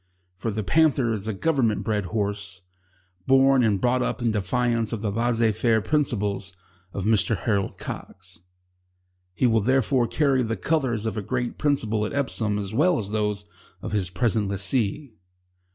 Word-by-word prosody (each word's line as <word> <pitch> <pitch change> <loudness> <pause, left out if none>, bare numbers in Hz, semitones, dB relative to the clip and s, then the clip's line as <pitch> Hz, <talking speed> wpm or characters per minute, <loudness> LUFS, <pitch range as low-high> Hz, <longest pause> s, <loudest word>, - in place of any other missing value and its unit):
For 105 +5 -4
The 110 0 -3
Panther 135 - +2
is 105 -1 -5
a - - 0 0.2
Government 115 -10 +2
bred 105 -2 -1
horse, 100 -2 -4 0.6
born 135 0 +5
and 105 -4 +2
brought 125 +3 +2
up - - -1
in 120 -2 +1
defiance 115 +3 0
of 115 -2 -4
the 105 - 0
laissez 115 +1 +2
faire 110 +1 +2
principles 105 -8 -1 0.3
of 95 0 -4
Mr 110 0 +2
Harold 100 -4 -1
Cox. 90 -2 -8 1.0
He 125 - +1
will 115 -2 +3
therefore 130 +1 +2
carry 130 +2 +2
the 115 -2 -2
colours 130 -9 0
of 110 -2 -3
a - - -1
great 120 +3 -3
principle 110 -8 0
at 105 - -3
Epsom 115 -7 0
as 100 0 -4
well 160 +7 +3
as 100 -2 -4
those 105 -1 -1 0.4
of - - -5
his 100 -4 -1
present 105 +2 0
lessee. 105 +6 -2
110 Hz, 165 wpm, -24 LUFS, 100-125 Hz, 1.0 s, born